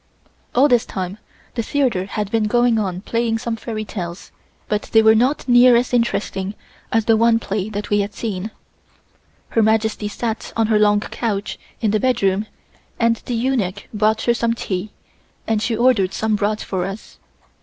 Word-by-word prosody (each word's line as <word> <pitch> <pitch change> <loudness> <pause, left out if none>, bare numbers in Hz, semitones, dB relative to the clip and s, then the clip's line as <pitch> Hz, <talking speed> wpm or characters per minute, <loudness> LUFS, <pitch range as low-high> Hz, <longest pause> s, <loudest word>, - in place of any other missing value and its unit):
All 265 +4 +6
this 245 -4 +3
time 190 +1 -5 0.3
the 235 - -1
theatre 235 -7 0
had 205 0 -4
been 225 -2 +1
going 240 +1 +3
on 185 -3 -2
playing 230 +1 0
some 235 0 -3
fairy 220 -1 -5
tales, 175 -3 -7 0.4
but 210 0 0
they 225 -1 +6
were 220 0 +7
not 255 +7 +1
near 245 0 +7
as 245 +1 +1
interesting 205 -4 -1 0.4
as 225 -1 +2
the 225 - +4
first 230 +1 +3
play 200 -1 -3
that 210 0 -5
we 205 - +3
had 205 +1 -2
seen. 210 -2 -4 1.0
Her 225 - +2
Majesty 220 -1 +1
sat 225 +2 -4
on 225 - +3
her 215 -1 +2
long 210 0 +4
couch 210 -2 -3 0.2
in 215 -3 +2
the 215 - +2
bedroom 205 -4 +1 0.5
and 230 0 +3
the 245 - -1
eunuch 230 -6 -1
brought 215 +1 +1
her 235 - +3
some 235 -1 0
tea 190 -2 -3 0.6
and 220 -1 0
she 225 0 -1
ordered 230 -6 +3
some 220 -1 0
brought 210 +1 -1
for 185 -2 -2
us. 195 +3 -8
220 Hz, 175 wpm, -20 LUFS, 205-235 Hz, 1.0 s, were